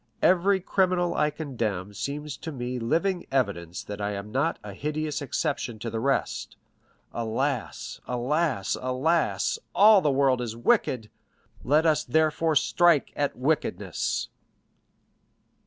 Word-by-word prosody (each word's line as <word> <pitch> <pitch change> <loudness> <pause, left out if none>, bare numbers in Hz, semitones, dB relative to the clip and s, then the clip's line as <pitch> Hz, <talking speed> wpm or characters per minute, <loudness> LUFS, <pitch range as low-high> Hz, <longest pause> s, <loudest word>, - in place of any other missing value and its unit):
Every 190 +2 +4
criminal 180 -1 +1
I 150 - +2
condemn 115 - -3
seems 145 +6 -4
to 160 - -6
me 125 -2 -4
living 170 +10 0
evidence 95 -10 -1
that 105 0 -7
I 105 0 -1
am 100 +1 -6
not 140 +7 0
a 105 -1 -7
hideous 150 +5 -3
exception 140 -4 -2
to 115 +2 -5
the 115 - -2
rest. 135 +4 -1 0.6
Alas, 115 -1 -3
alas, 125 - 0
alas; 135 +6 +1 0.2
all 210 -1 +7
the 150 - +2
world 135 -2 +2
is 115 -2 -4
wicked; 115 -1 +1 0.5
let 150 +6 +3
us 155 -4 +3
therefore 160 +3 +1
strike 170 +1 +3
at 145 -1 -1
wickedness!" 145 +5 -1
140 Hz, 125 wpm, -26 LUFS, 115-160 Hz, 0.6 s, all